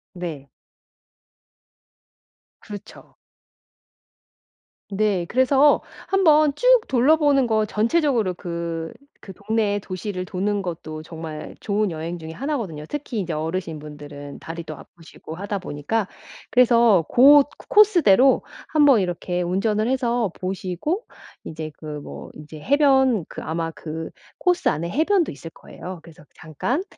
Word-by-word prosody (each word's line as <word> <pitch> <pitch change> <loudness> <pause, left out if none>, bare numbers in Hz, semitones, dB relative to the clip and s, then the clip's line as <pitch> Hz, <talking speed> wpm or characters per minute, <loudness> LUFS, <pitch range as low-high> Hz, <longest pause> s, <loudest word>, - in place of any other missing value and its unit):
네. 155 -7 -6 2.1
그렇죠. 205 -2 -11 1.8
네. 195 -3 0
그래서 270 +3 +4 0.3
한번 310 -6 +4
쭉 - - -1 0.2
둘러보는 280 0 +3
거 220 -1 +2
전체적으로 230 - +1
그, 170 -2 -5 0.3
그 195 - -10
동네에 210 +1 -1
도시를 185 -1 -5
도는 200 +2 -1
것도 160 -4 -6
정말 160 -1 -8
좋은 210 0 0
여행 165 +1 -5
중에 160 0 -8
1 285 - -3
거든요. 165 - -6
특히 270 -7 -4
이제 175 -3 -4
어르신 160 +1 -3
분들은 145 -1 -10
다리도 165 -1 -7
아프시고 165 -1 -12
하다 200 +2 -4
보니까 185 +6 -2 0.4
그래서 235 -8 +5
고 270 +4 +7
옷 285 0 +5 0.2
코스대로 345 - +5 0.2
한번 290 -6 +5
이렇게 180 -1 -2
운전을 205 +5 0
해서 245 -4 0
보시고 190 - -3 0.4
이제 155 -1 -6
그 - - -13 0.2
뭐 - - -9
이제 150 +1 -11
해변 265 - +3
그 - - -8
아마 165 0 -3
그 160 0 -7 0.3
코스 360 -1 +1
안에 170 +3 0
해변도 335 - +1
있을 145 +3 -9
거예요. 180 +2 -10
그래서 165 -1 -16
잠깐 200 - -3
195 Hz, 260 characters per minute, -22 LUFS, 165-260 Hz, 2.1 s, 고